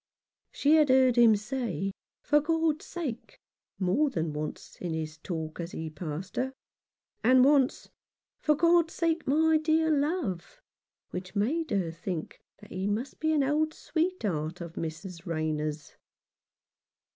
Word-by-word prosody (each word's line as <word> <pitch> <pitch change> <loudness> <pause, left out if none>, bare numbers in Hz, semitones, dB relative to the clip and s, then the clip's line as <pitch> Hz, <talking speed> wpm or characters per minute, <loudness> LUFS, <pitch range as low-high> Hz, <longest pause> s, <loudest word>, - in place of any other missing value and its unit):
She 300 +3 +4
had 300 -3 +4
heard 260 -1 +5
him 235 -3 +7
say, 215 -3 -3 0.3
"for 295 - +4
God's 320 0 0
sake," 285 -10 -6 0.4
more 205 +11 +2
than 160 - -2
once 150 0 -6
in 170 -3 -2
his 155 0 -5
talk 160 -2 -5
as 170 +1 -5
he 160 -1 -5
passed 160 +3 -6
her; 265 +1 -1 0.7
and 255 +2 +6
once 275 -2 +3 0.3
" - - -65
for 300 - +3
God's 335 +1 +3
sake, 330 -1 0
my 315 +3 +4
dear 315 +1 +2
love," 290 - -1 0.5
which 185 +2 -6
made 295 +11 0
her 190 -6 0
think 165 0 -5 0.2
that 210 - -14
he 190 +2 -2
must 225 +6 -3
be 315 0 +1
an 300 -3 +3
old 305 +3 +1
sweetheart 205 - -2
of 170 -2 -7
Mrs. 170 +3 -6
Rayner' 155 -2 -1
s. 150 0 -7
235 Hz, 145 wpm, -29 LUFS, -, 0.7 s, him